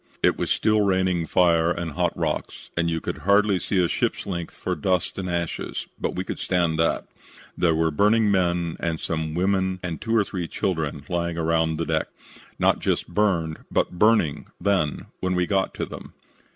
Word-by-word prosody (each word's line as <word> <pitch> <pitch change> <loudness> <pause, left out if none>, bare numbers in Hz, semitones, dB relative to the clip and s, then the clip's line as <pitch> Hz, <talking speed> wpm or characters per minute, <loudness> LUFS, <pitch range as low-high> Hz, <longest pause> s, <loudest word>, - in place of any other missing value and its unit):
It - - +4
was - - -2
still 110 -1 +3
raining 95 -4 +1
fire 85 -2 +3
and 85 -1 -2
hot - - -1
rocks - - -3
and 85 0 +1
you 80 0 -1
could - - -5
hardly 100 0 +3
see 100 - -1
a - - +1
ship's - - -1
length 85 -3 -4
for 90 - -2
dust 90 +4 0
and 90 -1 -3
ashes, 85 -2 -3
but - - -2
we 90 - -2
could - - -5
stand 85 -3 +1
that. 80 - +1 0.5
There 85 -2 +2
were 80 0 +2
burning 105 +6 +3
men 85 -3 +1
and 80 -2 -2
some 80 -1 -2
women 95 0 +1
and 85 -3 -4
two 115 0 0
or 110 - +5
three 90 -4 -4
children 80 -7 -2
lying 85 -1 -2
around 80 -1 +1
the 85 - -1
deck. 80 -1 0 0.5
Not - - +3
just - - -1
burned, 85 -7 +1
but 90 - 0
burning, 95 -10 +3
then, 90 -6 0
when 90 0 0
we 90 0 +2
got 95 0 0
to - - -2
them. - - -10
85 Hz, 190 wpm, -24 LUFS, 80-95 Hz, 0.5 s, or